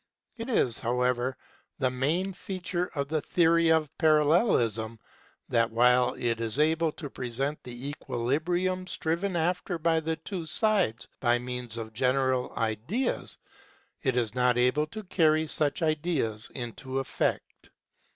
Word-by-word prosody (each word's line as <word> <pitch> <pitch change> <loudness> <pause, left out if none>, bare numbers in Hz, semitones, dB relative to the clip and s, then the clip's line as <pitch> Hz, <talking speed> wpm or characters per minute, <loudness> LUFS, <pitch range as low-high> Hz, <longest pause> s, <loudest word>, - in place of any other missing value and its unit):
It 230 +2 -6
is, 125 - +2
however, 125 +2 0 0.4
the 130 -3 +1
main 160 +10 0
feature 180 -1 -3
of 140 -1 -1
the 155 -1 0
theory 170 0 +3
of 160 -3 +1
Parallelism 150 - +3 0.5
that 115 -1 +2
while 125 +2 +4
it 115 -1 -1
is 115 +1 -3
able 160 +1 +2
to 150 - -7
present 135 +3 -3
the 125 +3 -6
equilibrium 155 +8 -1
striven 175 +3 -1
after 175 +2 0
by 165 0 +2
the 160 0 -2
two 175 -1 -6
sides 200 - +1
by 120 -1 +3
means 125 -2 -5
of 110 -1 -6
general 130 +2 +1
ideas, 115 - -2 0.6
it 130 -3 0
is 115 -4 0
not 125 -1 +2
able 125 +5 +2
to 215 +7 -7
carry 160 -4 +3
such 150 0 -1
ideas 150 -9 0
into 130 +2 -5
effect. 135 - -2
140 Hz, 135 wpm, -28 LUFS, 125-165 Hz, 0.6 s, while